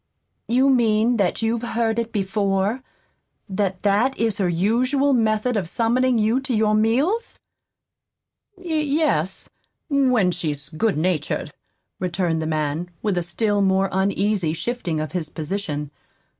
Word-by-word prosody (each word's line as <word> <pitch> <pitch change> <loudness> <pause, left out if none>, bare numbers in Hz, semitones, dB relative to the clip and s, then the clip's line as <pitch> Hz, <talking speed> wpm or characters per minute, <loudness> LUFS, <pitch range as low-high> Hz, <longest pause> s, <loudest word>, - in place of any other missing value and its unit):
"You 260 +3 +3
mean 230 -1 +3
that 200 +1 0
you've 225 +1 0
heard 230 -1 -1
it 230 0 -3
before? 200 +2 0 0.7
that 190 -2 -2
that 210 +7 +2
is 225 -2 0
her 185 -3 +1
usual 250 +11 +2
method 225 0 +1
of 185 -6 -1
summoning 240 +4 +2
you 220 +4 +2
to 265 -2 -2
your 215 0 +2
meals?" 265 - +1 1.2
"Y 355 -3 -5
yes, 285 - 0 0.4
when 255 -9 +3
she's 150 -5 -3
good 170 +4 0
natured," 165 -1 -1 0.5
returned 175 -2 -1
the 160 - -2
man, 155 +2 -2
with 205 -4 0
a 175 - 0
still 205 +4 0
more 190 0 +2
uneasy 195 -2 0
shifting 175 -4 -3
of 155 0 -4
his 170 -4 -3
position. 155 -3 -4
210 Hz, 135 wpm, -22 LUFS, 180-235 Hz, 1.2 s, You